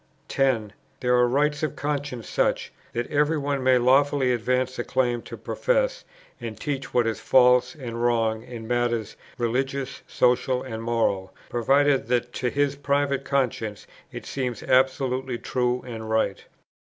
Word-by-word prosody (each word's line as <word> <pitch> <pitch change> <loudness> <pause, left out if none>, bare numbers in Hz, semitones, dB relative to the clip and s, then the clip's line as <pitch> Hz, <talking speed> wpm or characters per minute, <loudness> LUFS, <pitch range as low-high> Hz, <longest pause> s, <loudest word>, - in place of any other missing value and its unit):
10. 120 -7 +1 0.3
There 125 0 +1
are 125 0 +4
rights 145 +3 +1
of 155 -3 -2
conscience 145 -7 -3
such, - - 0 0.2
that 120 0 -2
every 150 +2 +2
one 140 -1 -1
may 130 0 +5
lawfully 135 +1 +3
advance 125 +2 -1
a - - 0
claim 120 -2 0
to - - -9
profess - - 0 0.3
and 115 -3 -7
teach 135 -2 -3
what 120 -2 +2
is 115 -2 -1
false 125 0 +4
and 120 -5 -6
wrong 115 -2 +1
in 115 -1 -9
matters, 120 -2 -1 0.2
religious, 135 +3 -2
social, 125 +1 +2
and 110 -4 -6
moral, 110 -5 -1
provided 135 +2 +2
that 120 0 0
to 125 - -1
his 145 +1 0
private 140 -1 0
conscience 120 -7 -1 0.3
it - - -8
seems 125 -4 -3
absolutely 130 -1 +1
true 125 +1 -1
and 110 -3 -7
right. 110 0 0
125 Hz, 150 wpm, -25 LUFS, 120-140 Hz, 0.3 s, may